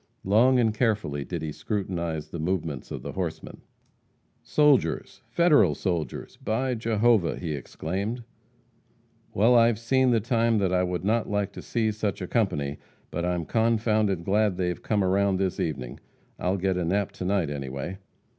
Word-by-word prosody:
Long 120 +7 +4
and 115 -3 +2
carefully 105 - 0
did 85 +1 -5
he 80 - -3
scrutinize 85 -5 -3
the 85 - -6
movements 80 -5 -2
of - - -6
the - - -5
horsemen. - - -5 0.8
"Soldiers 145 - +2
Federal 150 - +4
soldiers 85 -3 -3
by 125 +4 0
Jehovah!" 110 -4 +2
he 80 -4 -3
exclaimed. 95 - -4 1.1
"Well, 115 +5 +5
I've 115 -2 +5
seen 130 +3 +2
the 115 -2 +3
time 115 0 +1
that 95 -3 +1
I 90 - +3
would 90 0 -2
not 110 +2 +1
like 105 -1 -1
to - - -9
see 110 -2 0
such 105 -2 -2
a 90 - -4
company, 75 -11 -1 0.3
but 85 +1 -2
I'm 90 -2 -1
confounded 110 -5 +1
glad 100 -1 +2
they've 90 -1 -2
come 105 -2 0
around 95 +1 +2
this 95 -1 -1
evening. 65 -6 -3 0.4
I'll 95 +2 0
get 95 0 0
a 90 - 0
nap 100 +4 0
to 90 - -6
night, 95 -5 0
anyway." 70 +6 -5
100 Hz, 160 wpm, -26 LUFS, 85-115 Hz, 1.1 s, Well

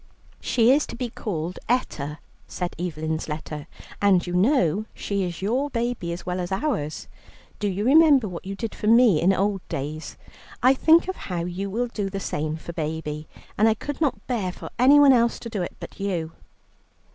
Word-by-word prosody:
"She 235 0 +3
is 290 +3 +3
to - - -7
be 245 -1 -4
called 180 -7 -4
Etta," 150 - -1 0.3
said 180 -1 -4
Evelyn's 160 -2 -3
letter, 150 -1 -5 0.3
"and 195 -3 +4
you 175 - -4
know 195 - +2
she 200 -1 -2
is 175 +1 -6
your 255 +8 0
baby 235 -8 -2
as 170 - -6
well 180 0 -2
as 175 +1 -4
ours. 190 - -2 0.5
Do 205 - 0
you 200 +2 -2
remember 285 -3 +6
what 175 -3 -7
you 195 +1 -5
did 225 +1 -4
for 210 - -4
me 225 -7 +6
in 180 +3 +4
old 195 0 0
days? 150 +3 -5 0.5
I 255 - +7
think 320 +6 +4
of 375 - -2
how 175 -2 -2
you 185 +3 -4
will 235 +5 -1
do 205 -4 -3
the 195 0 -4
same 155 -3 -3
for 170 +1 -8
baby, 155 -1 -4 0.3
and 220 +1 +6
I 220 - +2
could 290 +7 -6
not 295 -4 0
bear 215 -8 -1
for - - -10
anyone 280 +2 +7
else 235 -1 +3
to 230 - -8
do 205 -4 -2
it 175 - -4
but - - -10
you." 175 -5 -2
195 Hz, 190 wpm, -24 LUFS, 170-240 Hz, 0.5 s, I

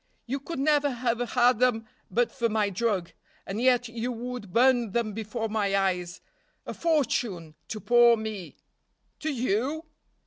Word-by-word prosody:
You 270 +3 -3
could 315 +4 -6
never 290 +1 +2
have 240 -2 -1
had 245 -2 +4
them 245 -3 +2 0.2
but 240 0 +1
for 235 -3 -1
my 210 -2 +1
drug. 195 -3 -1 0.3
And 205 +4 -4
yet 245 -1 +3
you 235 +2 -4
would 245 -4 -6
burn 240 -2 +3
them 230 -3 0
before 225 +1 -3
my 205 -2 0
eyes. 180 -3 -1 0.4
A - - -5
fortune 235 - 0
to 215 - -5
poor 240 0 +5
me." 215 -4 -6 0.6
"To 315 - -2
you?" 255 - -1
235 Hz, 150 wpm, -27 LUFS, 210-250 Hz, 0.6 s, poor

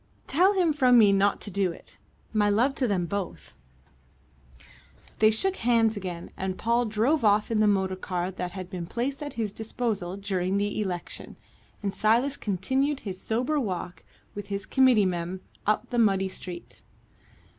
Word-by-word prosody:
"Tell 365 +8 +3
him 355 -5 +2
from 255 -4 +5
me 210 -3 +7
not 200 0 +2
to 205 - -5
do 190 -1 +1
it. - - -14 0.3
My 210 -1 +3
love 240 +7 +3
to 255 - +1
them 190 -5 0
both." 195 +1 -5 1.7
They 215 - +6
shook 380 - +1
hands 230 -2 +3
again, 180 -4 -6
and 190 -1 -3
Paul 235 +1 +1
drove 235 +7 +1
off 210 +1 +3
in 220 - +2
the 215 - +4
motor 190 -2 +1
car 180 -1 -3
that 180 -1 -5
had 185 -2 -6
been 180 -2 -6
placed 265 - -3
at 290 -1 -5
his 215 -3 -3
disposal 210 -4 -3
during 195 -1 -1
the 205 +1 -1
election, 180 -4 -5 0.5
and 200 -1 -1
Silas 240 +6 +2
continued 265 +9 -1
his 190 -3 -6
sober 255 +7 0
walk 180 -7 -4 0.3
with 205 -1 -7
his 200 0 -4
committee 255 -6 +4
men 180 0 -3 0.3
up 215 +3 0
the 240 - +1
muddy 195 -4 +3
street. 180 -2 -8
205 Hz, 165 wpm, -27 LUFS, 190-240 Hz, 1.7 s, me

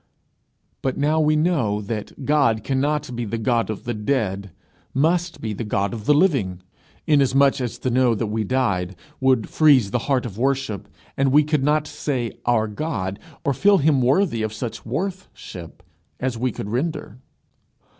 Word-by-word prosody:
But 130 - -1
now 150 +3 +2
we 155 0 +3
know 150 - +1
that 105 +5 -6
God 135 -7 +2
cannot 140 -1 -1
be 120 - -2
the 115 +1 -3
God 115 0 0
of 110 - -5
the 120 - -3
dead 105 -4 -1 0.5
must 170 +5 +1
be 110 -2 -3
the 110 - -4
God 100 -2 -1
of 110 -3 -6
the 150 - +5
living; 130 - +1 0.4
inasmuch 140 -2 +3
as 120 -2 -3
to 130 - -2
know 125 -1 +3
that 110 - -1
we 110 +1 -1
died, 100 -6 0 0.2
would 130 -4 +2
freeze 135 -10 +4
the 120 - +1
heart 130 -3 +2
of 110 -2 -7
worship, 135 -5 -1 0.3
and 135 -1 +2
we 150 +2 +6
could 150 -2 0
not 150 +1 +2
say 130 -6 -3 0.2
Our 110 -2 +3
God, 105 -5 -3 0.3
or 140 - +2
feel 200 +9 +4
him 145 -4 +3
worthy 130 - +2
of 110 -1 -2
such 115 +1 -6
worth 185 - -3
ship 90 -1 -10 0.4
as 130 -1 -1
we 125 +2 -1
could 105 -1 -6
render. 140 -2 -3
130 Hz, 175 wpm, -22 LUFS, 110-145 Hz, 0.5 s, we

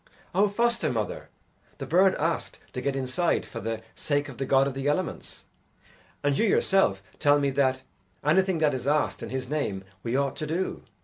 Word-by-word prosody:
"O 200 +3 +4
foster 230 - +1
mother, 110 -3 -3 0.5
the - - -5
bird 185 +3 +4
asked 165 +2 -2 0.2
to 125 - -3
get 140 +1 -1
inside 135 +6 0
for - - -7
the 115 +1 -3
sake 145 -1 -1
of 130 - -10
the 135 - -2
God 135 0 +4
of 140 - -2
the 135 +1 -3
Elements, 160 +4 -2 0.8
and 145 -1 +2
you 225 - +2
yourself 190 - +3 0.2
tell 145 -1 +5
me 140 -1 +1
that 130 -1 +1 0.4
anything 185 +4 +3
that 155 -2 +2
is 130 0 -4
asked 150 +1 +1
in - - -5
His 130 -1 -3
name 135 -10 -2 0.2
we 115 +4 -2
ought 140 0 +1
to 155 - -3
do. 175 +5 -2
145 Hz, 190 wpm, -27 LUFS, 130-170 Hz, 0.8 s, tell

